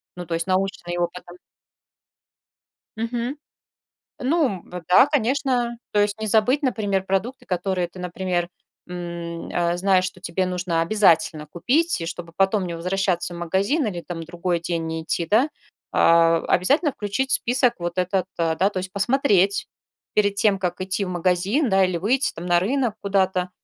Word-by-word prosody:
ну, 180 Hz, -1 st, -7 dB
то 165 Hz, -, -1 dB
есть 165 Hz, 0 st, -1 dB
наученный 185 Hz, -2 st, -1 dB
опытом. 175 Hz, 0 st, -4 dB, 1.6 s
Мгм, 235 Hz, +4 st, -3 dB, 0.8 s
ну, 315 Hz, +6 st, +2 dB
м, 190 Hz, -8 st, -4 dB
б 180 Hz, -1 st, -6 dB
да, 185 Hz, +9 st, +7 dB
конечно, 255 Hz, -3 st, 0 dB, 0.2 s
то 210 Hz, -, +3 dB
есть 205 Hz, +1 st, 0 dB
не 220 Hz, -, -2 dB
забыть, 235 Hz, +8 st, +3 dB
например, 205 Hz, -7 st, 0 dB
продукты, 195 Hz, +7 st, -2 dB
которые 180 Hz, -1 st, -1 dB
ты, 180 Hz, -, -14 dB
например, 180 Hz, -1 st, -2 dB, 0.4 s
м, 170 Hz, -1 st, -6 dB
э, 175 Hz, 0 st, 0 dB
знаешь, 185 Hz, 0 st, +3 dB
что 185 Hz, -1 st, -5 dB
тебе 185 Hz, +1 st, -1 dB
нужно 180 Hz, -2 st, -1 dB
обязательно 165 Hz, -5 st, +2 dB
купить, 255 Hz, -, 0 dB
чтобы 170 Hz, -1 st, -7 dB
потом 195 Hz, 0 st, +2 dB
не 170 Hz, -, -4 dB
возвращаться 180 Hz, 0 st, -1 dB
в -, -, -7 dB
магазин 195 Hz, -, 0 dB
или 180 Hz, -5 st, -3 dB
там 170 Hz, -1 st, -6 dB
другой 170 Hz, +1 st, -2 dB
день 170 Hz, -1 st, -2 dB
не 160 Hz, 0 st, -4 dB
идти, 165 Hz, +1 st, -2 dB
да. 235 Hz, -, +3 dB, 0.4 s
А, 165 Hz, 0 st, +5 dB
обязательно 285 Hz, -, +2 dB
включить 235 Hz, +6 st, -2 dB
в -, -, +6 dB
список 245 Hz, 0 st, +2 dB
вот 175 Hz, 0 st, -4 dB
этот, 185 Hz, 0 st, 0 dB
да, 165 Hz, -1 st, 0 dB
то 190 Hz, -, -4 dB
есть 185 Hz, 0 st, -5 dB
посмотреть 200 Hz, -3 st, +2 dB, 0.5 s
перед 205 Hz, -1 st, +2 dB
тем, 200 Hz, -1 st, +2 dB
как 180 Hz, -1 st, -3 dB
идти 190 Hz, +2 st, -1 dB
в -, -, -5 dB
магазин, 185 Hz, -, +1 dB
да, 190 Hz, 0 st, +4 dB
или 185 Hz, -1 st, 0 dB
выйти 240 Hz, +10 st, +1 dB
там 170 Hz, -, -8 dB
на 175 Hz, -1 st, +4 dB
рынок 240 Hz, +1 st, 0 dB
куда-то 190 Hz, -2 st, 0 dB
185 Hz, 165 wpm, -23 LUFS, 175-215 Hz, 1.6 s, да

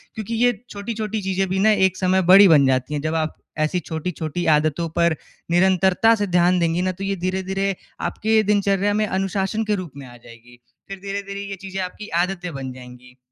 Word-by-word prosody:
क्योंकि 220 Hz, +1 st, -5 dB
ये 245 Hz, -, +5 dB, 0.2 s
छोटी-छोटी 215 Hz, +1 st, -4 dB
चीज़ें 190 Hz, 0 st, -1 dB
भी 190 Hz, -, -1 dB
ना 215 Hz, +2 st, +4 dB, 0.2 s
एक 185 Hz, -, -8 dB
समय 185 Hz, 0 st, +2 dB
बड़ी 200 Hz, +1 st, +9 dB
बन 150 Hz, -5 st, +6 dB
जाती 130 Hz, +2 st, 0 dB
हैं। 145 Hz, -, -2 dB
जब 155 Hz, +2 st, -2 dB
आप 155 Hz, -1 st, -1 dB, 0.3 s
ऐसी 180 Hz, +4 st, -1 dB
छोटी-छोटी 160 Hz, 0 st, -4 dB
आदतों 155 Hz, +2 st, -1 dB
पर 170 Hz, 0 st, +1 dB, 0.4 s
निरंतरता 190 Hz, +4 st, +4 dB
से 205 Hz, -2 st, -2 dB
ध्यान 180 Hz, 0 st, +3 dB
देंगी 170 Hz, 0 st, +1 dB
ना 185 Hz, 0 st, 0 dB
तो 190 Hz, +2 st, -8 dB
ये 195 Hz, 0 st, -1 dB
धीरे-धीरे 190 Hz, +2 st, -2 dB, 0.3 s
आपके 220 Hz, 0 st, +1 dB
दिनचर्या 200 Hz, -1 st, +1 dB
में 215 Hz, +1 st, +1 dB
अनुशासन 195 Hz, +2 st, -1 dB
के 210 Hz, -1 st, +1 dB
रूप 185 Hz, -6 st, -6 dB
में 140 Hz, -, -9 dB
आ 120 Hz, -, -13 dB
जाएगी, 120 Hz, +1 st, -16 dB, 0.3 s
फ़िर 195 Hz, -1 st, -8 dB
धीरे-धीरे 200 Hz, 0 st, -5 dB
ये 200 Hz, -1 st, -6 dB
चीज़ें 195 Hz, 0 st, -5 dB
आपकी 185 Hz, +3 st, -7 dB, 0.2 s
आदतें 180 Hz, -2 st, -5 dB
बन 135 Hz, -1 st, -5 dB
जाएँगी। 125 Hz, 0 st, -14 dB
185 Hz, 195 wpm, -21 LUFS, 160-200 Hz, 0.4 s, बड़ी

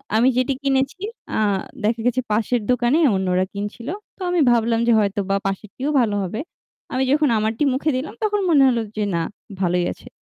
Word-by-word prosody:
আমি 230 Hz, +3 st, +4 dB
যেটি 255 Hz, +2 st, +2 dB
কিনেছি 270 Hz, +5 st, 0 dB, 0.4 s
আ -, -, +1 dB, 0.4 s
দেখা 225 Hz, +2 st, +1 dB
গেছে 250 Hz, +1 st, +1 dB
পাশের 230 Hz, +3 st, +1 dB
দোকানে 250 Hz, +3 st, +2 dB, 0.2 s
অন্যরা 185 Hz, -1 st, +1 dB
কিনছিল। 205 Hz, +4 st, -6 dB, 0.3 s
তো -, -, -17 dB
আমি 355 Hz, 0 st, +1 dB
ভাবলাম 230 Hz, -1 st, +2 dB
যে -, -, +5 dB
হয়তোবা 200 Hz, -1 st, 0 dB
পাশেরটিও 215 Hz, +8 st, -4 dB
ভালো 215 Hz, -4 st, 0 dB
হবে। 190 Hz, +4 st, -4 dB, 0.5 s
আমি 260 Hz, +1 st, +1 dB
যখন 295 Hz, 0 st, +3 dB
আমারটি 220 Hz, +5 st, 0 dB
মুখে 275 Hz, +4 st, 0 dB
দিলাম 260 Hz, +4 st, -3 dB
তখন 415 Hz, -1 st, +1 dB
মনে 290 Hz, -5 st, +6 dB
হলো 240 Hz, -2 st, +1 dB, 0.2 s
যে 210 Hz, -, +1 dB
না -, -, +1 dB, 0.4 s
ভালোই 180 Hz, -1 st, +1 dB
আছে। -, -, -17 dB
235 Hz, 175 wpm, -21 LUFS, 205-265 Hz, 0.5 s, মনে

